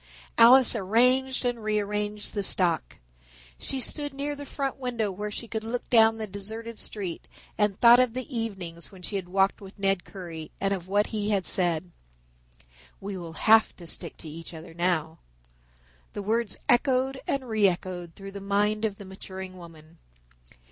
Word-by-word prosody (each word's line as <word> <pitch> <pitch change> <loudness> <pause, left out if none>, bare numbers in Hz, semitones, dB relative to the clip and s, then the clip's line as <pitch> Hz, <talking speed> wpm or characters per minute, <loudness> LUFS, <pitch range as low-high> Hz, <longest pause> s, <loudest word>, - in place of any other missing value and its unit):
Alice 250 +2 +8
arranged 250 +6 +3
and 240 -2 -1
rearranged 210 0 -1
the 205 - -1
stock. 180 -3 +1 0.6
She 270 - -2
stood 290 +2 -2
near 290 +1 -2
the 285 0 -8
front 275 -2 -3
window 240 -6 -2
where 210 +3 -4
she 230 +3 -6
could 220 -1 -4
look 235 +2 -4
down 225 -2 +6
the 220 - -3
deserted 220 +3 -6
street 190 -5 -4 0.3
and 210 -2 +1
thought 240 +1 +8
of 250 -2 +2
the 255 -1 -3
evenings 190 -7 -4
when 185 -2 -14
she 200 - -4
had 185 -3 -3
walked 195 +2 +2
with 195 +1 -12
Ned 195 -2 +1
Currie 170 -5 -8
and 195 0 +1
of 185 -2 -5
what 205 +2 +2
he 210 -1 -1
had 195 -4 +1
said. 175 -1 +1 1.1
"We 200 0 -5
will 170 -3 -7
have 220 +6 +5
to 175 - -11
stick - - -6
to - - -8
each 165 +2 -8
other 165 +1 -10
now." 165 -2 -1 0.9
The 205 - -5
words 225 0 0
echoed 260 +2 +2
and 270 -2 -1
re 215 -3 +4
echoed 175 -2 -3
through 195 0 -9
the 200 0 -8
mind 210 +2 +1
of 210 -2 -1
the 200 - -10
maturing 190 0 -8
woman. 165 -2 -14
205 Hz, 175 wpm, -27 LUFS, 185-230 Hz, 1.1 s, Alice